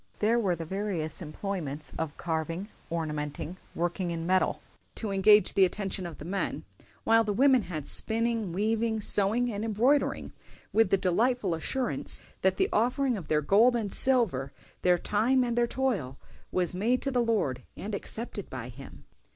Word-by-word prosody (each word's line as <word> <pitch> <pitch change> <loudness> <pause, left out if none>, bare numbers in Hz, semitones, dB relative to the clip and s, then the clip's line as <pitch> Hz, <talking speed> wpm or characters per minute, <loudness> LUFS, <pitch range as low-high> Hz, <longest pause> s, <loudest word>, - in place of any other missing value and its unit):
There 225 +3 +2
were 190 -6 +1
the 165 0 -6
various 185 -4 -3
employments 155 -3 -5
of 160 -2 -4
carving, 165 +4 -3 0.2
ornamenting, 155 +1 -4 0.2
working 175 +1 -1
in 165 -1 -3
metal, 185 +1 +2 0.4
to 215 -3 -3
engage 210 +2 +5
the 195 - +5
attention 190 -1 -1
of 165 - -9
the 150 - -9
men; 195 +3 -2 0.4
while 225 0 +4
the 210 -2 -1
women 260 +1 +5
had 170 -6 -6
spinning, 230 -3 0
weaving, 220 +4 0
sewing, 215 +4 +1
and 205 +1 -3
embroidering, 235 +7 +1 0.4
with 225 -3 +4
the 195 - +4
delightful 200 +2 +1
assurance 250 +11 -1 0.2
that - - +2
the 385 - +3
offering 250 +3 +2
of 185 -7 -7
their 150 -1 +2
gold 220 - +4
and 215 -4 -2
silver, 205 - +3 0.3
their 180 -1 +4
time 230 +8 +2
and 240 -1 -1
their 240 0 +2
toil, 215 - -1 0.3
was 180 -2 0
made 230 +7 +1
to 275 - 0
the 250 -2 +2
Lord 205 - 0 0.2
and 210 +2 -5
accepted 205 0 -3
by 125 -2 -6
Him." 135 +3 -12
200 Hz, 165 wpm, -28 LUFS, 170-230 Hz, 0.4 s, engage